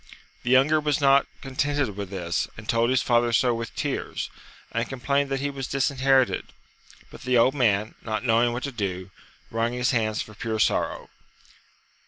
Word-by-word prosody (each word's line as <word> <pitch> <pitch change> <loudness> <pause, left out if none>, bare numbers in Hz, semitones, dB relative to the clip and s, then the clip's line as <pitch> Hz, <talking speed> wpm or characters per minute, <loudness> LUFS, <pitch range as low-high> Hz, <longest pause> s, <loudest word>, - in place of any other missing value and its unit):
The 120 - -4
younger 135 +5 +5
was 150 -2 0
not 140 -1 +4
contented 135 -3 -1
with 100 -2 -5
this, 90 -2 -2
and 105 -1 -10
told 115 +1 +2
his 130 - +2
father 120 -1 +2
so 120 +1 +3
with 115 -1 -5
tears, - - -3 0.4
and 115 0 -2
complained 140 +2 0
that 135 -1 -1
he 145 0 -1
was 135 -2 -5
disherited; 135 -1 +2 0.6
but - - -12
the 125 0 +2
old 125 +3 +4
man, 110 -6 +1
not 110 0 -3
knowing 120 +1 +3
what 120 +2 -4
to 140 - -3
do, 95 -5 -4 0.4
wrung 115 +1 0
his 125 0 +1
hands 110 -3 0
for 110 - -5
pure 110 +2 -3
sorrow. 105 - 0
120 Hz, 175 wpm, -25 LUFS, 110-135 Hz, 0.6 s, younger